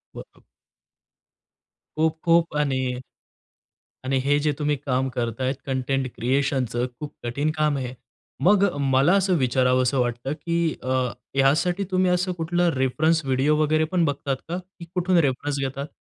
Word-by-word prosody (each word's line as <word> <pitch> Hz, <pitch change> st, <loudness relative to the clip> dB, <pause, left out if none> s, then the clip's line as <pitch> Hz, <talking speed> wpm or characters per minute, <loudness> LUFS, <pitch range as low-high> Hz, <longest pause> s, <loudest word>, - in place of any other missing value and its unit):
बरं. -, -, -12 dB, 1.6 s
खूप-खूप 160 Hz, +1 st, +2 dB
आणि 140 Hz, -3 st, +1 dB, 1.2 s
आणि 135 Hz, +1 st, +1 dB
हे 145 Hz, +1 st, +3 dB
जे 150 Hz, +1 st, +1 dB
तुम्ही 150 Hz, 0 st, +1 dB
काम 130 Hz, -1 st, -1 dB
करतायत 125 Hz, +2 st, -2 dB
कंटेंट 135 Hz, 0 st, -1 dB
क्रिएशनचं 125 Hz, -1 st, 0 dB
खूप 150 Hz, -, -7 dB
कठीण 140 Hz, +6 st, -1 dB
काम 150 Hz, -2 st, +2 dB
आहे 130 Hz, -2 st, -3 dB
हे. 125 Hz, -, -8 dB, 0.5 s
मग 200 Hz, +2 st, +5 dB
अ, 175 Hz, -, -7 dB
मला 135 Hz, +4 st, +3 dB
असं 190 Hz, -2 st, +2 dB
विचारावसं 130 Hz, 0 st, +2 dB
वाटतं 120 Hz, +2 st, -1 dB
की 170 Hz, +1 st, -1 dB
अ, -, -, -7 dB, 0.5 s
ह्यासाठी 155 Hz, +8 st, +2 dB
तुम्ही 185 Hz, -1 st, +2 dB
असं 180 Hz, +1 st, +1 dB
कुठलं 175 Hz, +1 st, 0 dB
रेफरन्स 155 Hz, +5 st, +1 dB
व्हिडिओ 135 Hz, +3 st, +2 dB
वगैरे 155 Hz, +1 st, +2 dB
पण 180 Hz, -3 st, +2 dB
बघतात 140 Hz, -2 st, -1 dB
का? 175 Hz, -, -2 dB
की 180 Hz, -1 st, -11 dB
कुठून 180 Hz, 0 st, +1 dB
रेफरन्स 140 Hz, +2 st, -2 dB
घेतात? 135 Hz, +1 st, -3 dB
145 Hz, 140 wpm, -24 LUFS, 130-165 Hz, 1.6 s, मग